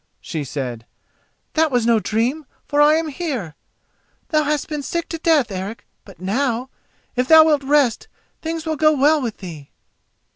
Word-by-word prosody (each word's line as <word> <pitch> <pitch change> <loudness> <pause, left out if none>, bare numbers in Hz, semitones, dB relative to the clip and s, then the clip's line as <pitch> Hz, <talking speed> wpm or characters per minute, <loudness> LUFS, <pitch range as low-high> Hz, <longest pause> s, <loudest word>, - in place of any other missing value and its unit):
she 155 -2 -5
said; 125 -4 -5 0.7
"that 320 0 +3
was 245 -4 +1
no 230 -1 +4
dream, 245 +8 -1 0.2
for 290 0 +2
I 300 +1 +6
am 320 0 -1
here. 265 - -4 0.8
Thou 310 -3 +3
hast 295 -1 -1
been 300 -2 -4
sick 340 +4 -3
to 330 - -5
death, 310 -8 +2
Eric; 195 +4 -6 0.2
but 195 -5 -15
now, 245 +6 -1 0.4
if 250 0 0
thou 320 +1 +9
wilt 300 -3 +3
rest, 275 -4 +2 0.3
things 325 0 -4
shall 320 -1 -2
go 310 0 +4
well 295 +2 +3
with 235 -4 -4
thee." 160 -7 -9
275 Hz, 170 wpm, -20 LUFS, 220-310 Hz, 0.8 s, thou